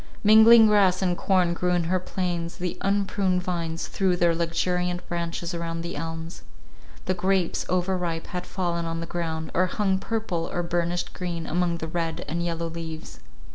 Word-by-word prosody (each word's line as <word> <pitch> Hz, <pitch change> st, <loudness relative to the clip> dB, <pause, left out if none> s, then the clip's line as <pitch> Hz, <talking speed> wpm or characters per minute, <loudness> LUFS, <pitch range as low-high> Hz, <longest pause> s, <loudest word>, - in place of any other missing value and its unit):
Mingled 220 Hz, +2 st, +8 dB
grass 195 Hz, -3 st, +4 dB
and 180 Hz, -1 st, +1 dB
corn 180 Hz, -2 st, +2 dB
grew 180 Hz, +1 st, 0 dB
in 175 Hz, -1 st, +2 dB
her 185 Hz, +3 st, +1 dB
plains, 175 Hz, -2 st, -3 dB
the 180 Hz, -1 st, -3 dB
unpruned 195 Hz, -2 st, +1 dB
vines 170 Hz, -2 st, -3 dB
threw 185 Hz, -2 st, +1 dB
their 170 Hz, -1 st, +3 dB
luxuriant 175 Hz, +2 st, -1 dB
branches 170 Hz, 0 st, -3 dB
around 165 Hz, -1 st, -3 dB
the 170 Hz, -, -5 dB
elms. 165 Hz, +2 st, -6 dB, 0.6 s
The -, -, +1 dB
grapes, 185 Hz, -1 st, 0 dB
overripe, 180 Hz, -2 st, -1 dB
had 180 Hz, -1 st, -5 dB
fallen 170 Hz, -2 st, -2 dB
on 165 Hz, 0 st, -3 dB
the 165 Hz, -, -4 dB
ground, 160 Hz, -2 st, -4 dB
or 185 Hz, +1 st, +3 dB
hung 190 Hz, 0 st, 0 dB
purple, 195 Hz, -6 st, -2 dB
or 175 Hz, -, -1 dB
burnished 175 Hz, +1 st, -1 dB
green, 170 Hz, -3 st, -4 dB
among 175 Hz, +1 st, 0 dB
the 160 Hz, -, -5 dB
red 165 Hz, 0 st, -3 dB
and 170 Hz, +2 st, -2 dB
yellow 170 Hz, -1 st, -2 dB
leaves. 165 Hz, -1 st, -7 dB
175 Hz, 170 wpm, -25 LUFS, 165-185 Hz, 0.6 s, Mingled